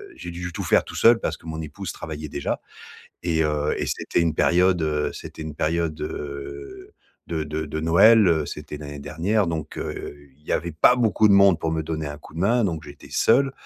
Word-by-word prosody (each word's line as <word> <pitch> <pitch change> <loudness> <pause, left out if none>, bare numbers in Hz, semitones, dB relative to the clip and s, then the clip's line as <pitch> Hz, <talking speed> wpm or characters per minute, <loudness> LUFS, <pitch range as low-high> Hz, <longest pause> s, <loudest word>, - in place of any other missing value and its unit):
j'ai - - -8
dû 90 +1 -5
tout - - -4
faire - - +3
tout - - -11
seul 115 0 +6
parce - - -3
que 80 - -16
mon 80 0 -5
épouse 80 +5 -6
travaillait 75 -1 -7
déjà - - -3 0.6
et 80 -2 +1
heu 75 -1 0
et - - -1
c'était - - -1
une 80 -2 +1
période, 90 0 +3
heu 75 -1 0
c'était - - -9
une 80 -1 -6
période, 80 0 -1
heu, 70 -1 -7 0.4
de 80 -2 -2
de 75 +1 -3
de 80 +2 -4
Noël, 100 +7 +6
heu, 80 -4 +2
c'était 75 - -7
l'année 75 -1 -8
dernière, 90 +8 0
donc 80 -3 -4
heu, 75 - -5 0.2
il 75 - -28
y - - -7
avait 85 +1 -1
pas 125 +11 +5
beaucoup 110 -2 +3
de - - +5
monde 100 -3 +6
pour 80 - -1
me 80 0 -1
donner 80 -1 -4
un 75 0 -7
coup 75 - -15
de 85 - -5
main, 115 +4 +3
donc 80 -5 -2
j'étais 70 -2 -12
seul 135 +3 +3
80 Hz, 220 wpm, -24 LUFS, 75-90 Hz, 0.6 s, seul